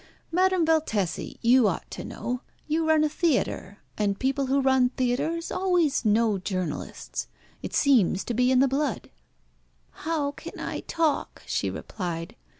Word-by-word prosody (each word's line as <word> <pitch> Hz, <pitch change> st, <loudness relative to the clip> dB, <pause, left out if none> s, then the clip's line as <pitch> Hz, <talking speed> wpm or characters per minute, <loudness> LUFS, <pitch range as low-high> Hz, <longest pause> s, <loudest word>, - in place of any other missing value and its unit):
"Madame 370 Hz, 0 st, +3 dB
Valtesi, 260 Hz, -, 0 dB
you 240 Hz, -1 st, +6 dB
ought -, -, -3 dB
to -, -, -6 dB
know; 250 Hz, +1 st, -4 dB, 0.3 s
you 315 Hz, +1 st, +1 dB
run 310 Hz, -1 st, +5 dB
a -, -, +4 dB
theatre, 290 Hz, -, 0 dB, 0.2 s
and 200 Hz, -2 st, +1 dB
people 270 Hz, +1 st, 0 dB
who 275 Hz, +2 st, +2 dB
run 265 Hz, -2 st, +4 dB
theatres 260 Hz, +7 st, -1 dB
always 355 Hz, -8 st, +2 dB
know 215 Hz, -2 st, +3 dB
journalists. 185 Hz, -5 st, -4 dB, 0.3 s
It -, -, -5 dB
seems 235 Hz, -, +3 dB
to 240 Hz, -, -3 dB
be 250 Hz, +2 st, +3 dB
in 260 Hz, 0 st, +4 dB
the 275 Hz, -, +5 dB
blood." 280 Hz, +3 st, -2 dB, 0.8 s
"How 310 Hz, -3 st, -2 dB
can -, -, -10 dB
I -, -, -3 dB
talk?" 320 Hz, -3 st, -1 dB
she -, -, -1 dB
replied. 175 Hz, -1 st, -5 dB
265 Hz, 150 wpm, -26 LUFS, 220-315 Hz, 0.8 s, you